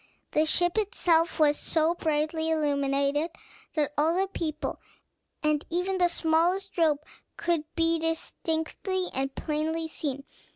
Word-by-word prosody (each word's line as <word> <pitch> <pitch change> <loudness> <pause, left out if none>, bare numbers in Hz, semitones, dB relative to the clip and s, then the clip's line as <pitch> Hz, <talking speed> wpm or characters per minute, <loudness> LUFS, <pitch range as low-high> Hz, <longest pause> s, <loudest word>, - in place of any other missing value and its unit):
The 310 +1 +3
ship 350 +5 +2
itself 345 -5 +2
was 295 -2 +4
so 320 +1 +2
brightly 315 0 0
illuminated 285 0 +1 0.5
that 295 -2 +1
all 320 +3 +3
the 385 - +2
people, 330 -5 -3 0.6
and 305 -1 +2
even 365 +3 -1
the 355 - +5
smallest 345 +4 +1
rope, 305 -4 +2 0.3
could 335 -3 0
be 330 0 +2
distinctly 325 +3 -2
and 270 +1 -2
plainly 320 +1 -1
seen. 280 -3 -4
320 Hz, 125 wpm, -28 LUFS, 300-340 Hz, 0.6 s, the